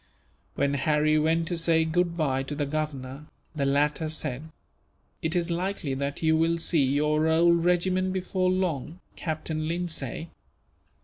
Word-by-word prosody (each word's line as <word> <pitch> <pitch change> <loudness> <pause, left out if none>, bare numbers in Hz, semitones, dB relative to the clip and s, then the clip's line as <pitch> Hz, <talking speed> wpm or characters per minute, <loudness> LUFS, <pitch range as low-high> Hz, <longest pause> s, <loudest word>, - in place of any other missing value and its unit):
When 140 0 +1
Harry 150 +2 +2
went 160 +1 +1
to 175 - -2
say 165 -1 +3
goodbye 160 -5 0
to 145 - -3
the 145 0 -1
Governor, 140 -2 -4 0.3
the 140 -2 0
latter 150 +3 +1
said: 155 -1 -4 0.7
"It 160 +2 -1
is 175 0 0
likely 175 -4 -2
that 140 +3 -3
you 160 0 +4
will 165 +1 +2
see 165 -2 +2
your 150 +3 +2
old 170 +1 +4
regiment 185 +1 +2
before 185 0 0
long, 175 -3 -1 0.2
Captain 155 -1 -3
Lindsay. 165 -3 -3
160 Hz, 140 wpm, -27 LUFS, 145-170 Hz, 0.7 s, you